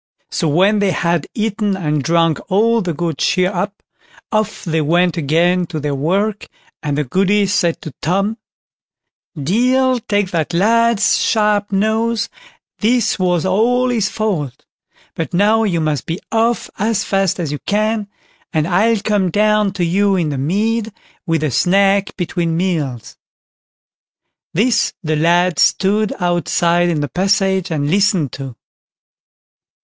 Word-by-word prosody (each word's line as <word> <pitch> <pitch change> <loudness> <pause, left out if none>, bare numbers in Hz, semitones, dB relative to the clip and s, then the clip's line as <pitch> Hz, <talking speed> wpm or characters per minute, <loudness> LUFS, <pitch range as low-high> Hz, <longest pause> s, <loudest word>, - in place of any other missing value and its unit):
So 165 - -1
when 190 +8 +3
they 200 -1 +2
had 170 -3 0
eaten 210 -2 -1
and 150 -5 -1
drank 165 0 +2
all 225 +4 +2
the 180 -3 -2
good 165 -1 -3
cheer 185 +1 +1
up, 200 +3 -4 0.5
off 215 -1 -1
they 160 -2 0
went 175 +3 +2
again 170 +3 +1
to 160 -2 -5
their 145 -1 -2
work, 195 +9 -1 0.3
and 145 -2 -2
the 150 - +1
Goody 195 +8 +1
said 185 -4 0
to 155 - -8
Tom: 195 +7 -1 1.0
"Deil 250 - +2
take 205 -3 -1
that 165 0 -2
lad's 230 +3 +3
sharp 210 -2 +1
nose, 220 +3 0 0.5
this 230 -1 +1
was 180 -2 +1
all 240 +7 +2
his 220 -5 0
fault; 180 - -3 0.5
but 165 +1 -4
now 210 +4 +3
you 175 -5 0
must 155 -4 -2
be 165 +3 -3
off 230 +1 +1
as 215 0 0
fast 195 -2 0
as 160 -5 -2
you 145 - -4
can, 215 0 0 0.4
and 155 0 0
I'll 210 +4 +2
come 205 -4 0
down 210 +2 +2
to 180 -3 -1
you 195 +3 +2
in 170 -5 0
the 140 - -3
mead 215 - -1 0.4
with 165 -2 0
a 150 - 0
snack 195 +5 +2
between 170 -2 -2
meals." 155 - -3 1.4
This 225 +6 +2
the 155 -1 0
lad 170 +3 +2
stood 205 +2 +2
outside 175 0 +1
in 160 -3 -1
the 145 - -1
passage 190 +1 0
and 145 -3 -1
listened 190 - +2
to. 135 -3 -7
190 Hz, 145 wpm, -17 LUFS, 165-210 Hz, 1.4 s, when